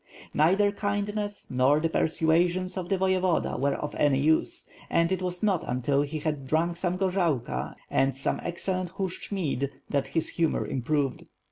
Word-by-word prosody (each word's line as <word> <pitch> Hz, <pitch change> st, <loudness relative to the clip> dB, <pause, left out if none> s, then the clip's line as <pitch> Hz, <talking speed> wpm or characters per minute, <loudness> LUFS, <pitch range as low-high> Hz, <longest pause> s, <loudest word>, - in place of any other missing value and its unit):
Neither 190 Hz, +7 st, +4 dB
kindness 205 Hz, 0 st, -3 dB
nor 130 Hz, +4 st, +4 dB
the 165 Hz, -, +1 dB
persuasions 170 Hz, +3 st, +1 dB
of 180 Hz, -2 st, -4 dB
the 195 Hz, -, +2 dB
Voyevoda 185 Hz, -2 st, +1 dB
were 140 Hz, +1 st, +1 dB
of 150 Hz, -, -4 dB
any 145 Hz, -2 st, +3 dB
use, 155 Hz, +3 st, +1 dB, 0.2 s
and 170 Hz, +1 st, +2 dB
it 190 Hz, -1 st, 0 dB
was 180 Hz, 0 st, -3 dB
not 195 Hz, -5 st, +2 dB
until 130 Hz, +3 st, +1 dB
he 145 Hz, +2 st, -3 dB
had 150 Hz, -3 st, -3 dB
drunk 170 Hz, +4 st, +1 dB
some 180 Hz, 0 st, -1 dB
gorzalka 180 Hz, -9 st, 0 dB
and 135 Hz, 0 st, +1 dB
some 135 Hz, -, -1 dB
excellent 180 Hz, +1 st, -3 dB
Hushch 190 Hz, 0 st, -4 dB
mead, 140 Hz, -9 st, -1 dB, 0.2 s
that 140 Hz, -2 st, +1 dB
his 165 Hz, -, -1 dB
humor 165 Hz, -2 st, 0 dB
improved. 135 Hz, 0 st, -1 dB
170 Hz, 160 wpm, -27 LUFS, 145-185 Hz, 0.2 s, Neither